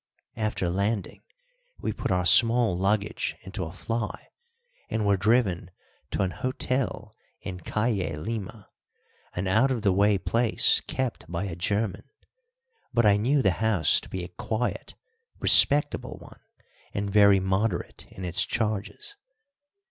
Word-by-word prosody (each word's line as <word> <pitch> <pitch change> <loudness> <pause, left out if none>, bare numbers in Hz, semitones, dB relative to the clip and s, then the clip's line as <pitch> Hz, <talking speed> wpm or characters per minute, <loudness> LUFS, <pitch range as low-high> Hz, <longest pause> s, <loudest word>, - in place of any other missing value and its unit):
After 110 -4 -2
landing 100 +4 -2 0.6
we - - -3
put - - -4
our 90 -1 0
small 115 +2 +5
luggage 100 +3 -1
into 95 0 -6
a 80 - -7
fly 110 +4 -5 0.6
and 110 -2 -1
were 100 0 +3
driven 100 -3 +1 0.4
to - - -1
an 95 - -1
hotel 125 -3 -3 0.3
in 90 -2 -7
Calle 95 -4 -2
Lima, 105 +2 -6 0.7
an 90 +2 -2
out 110 +8 +3
of 120 -5 -2
the 100 -3 +3
way 100 +1 +3
place 115 +4 +2
kept 130 -8 -4
by 85 +2 -2
a 95 -4 -5
German; 100 +6 -2 0.8
but 120 -2 +2
I 100 -1 +5
knew 130 +7 +1
the 95 - +4
house 110 -7 +4
to - - -13
be 95 -1 -5
a - - -6
quiet, 110 +6 -4 0.4
respectable 145 +1 +4
one - - -15 0.6
and 100 0 -2
very 100 -1 +5
moderate 95 0 -2
in 95 - -8
its 85 -1 +2
charges. 110 - -3
105 Hz, 140 wpm, -26 LUFS, 95-115 Hz, 0.8 s, small